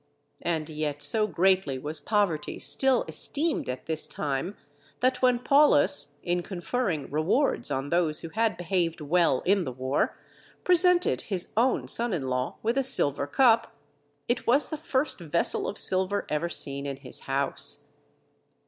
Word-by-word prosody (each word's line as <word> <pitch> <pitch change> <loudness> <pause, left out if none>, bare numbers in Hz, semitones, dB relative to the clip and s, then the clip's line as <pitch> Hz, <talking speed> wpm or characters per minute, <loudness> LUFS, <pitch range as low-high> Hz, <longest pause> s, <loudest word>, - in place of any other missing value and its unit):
And 160 -3 -2
yet 150 -2 -3
so 210 +9 +3
greatly 185 -5 +1
was 150 +4 -5
poverty 200 -8 -1
still 265 -2 +1
esteemed 315 - -1
at 125 0 -5
this 160 -1 -3
time, 150 +5 -4 0.4
that 255 0 +1
when 250 -1 +4
Paulus, 240 - +3
in 175 0 -1
conferring 175 - -3
rewards 170 - 0
on 135 +2 -3
those 170 -3 +3
who 165 - -7
had 220 +4 0
behaved 175 -1 -1
well 155 -3 +1
in 195 0 +2
the 130 - -4
war, 130 +2 -2 0.5
presented 360 0 +3
his 190 -3 -2
own 245 +4 +1
son 235 -2 0
in 135 -7 -3
law 125 0 -2
with 230 +4 +1
a - - +1
silver 145 - 0
cup, 230 - +3 0.5
it 240 - -1
was 270 +5 +3
the 315 - -3
first 295 -4 -2
vessel 170 -1 0
of 205 - -5
silver 190 +2 +4
ever 150 +3 -1
seen 140 -3 -3
in 140 -1 -5
his 135 -2 -8
house. 135 +1 -2
175 Hz, 155 wpm, -27 LUFS, 145-235 Hz, 0.5 s, when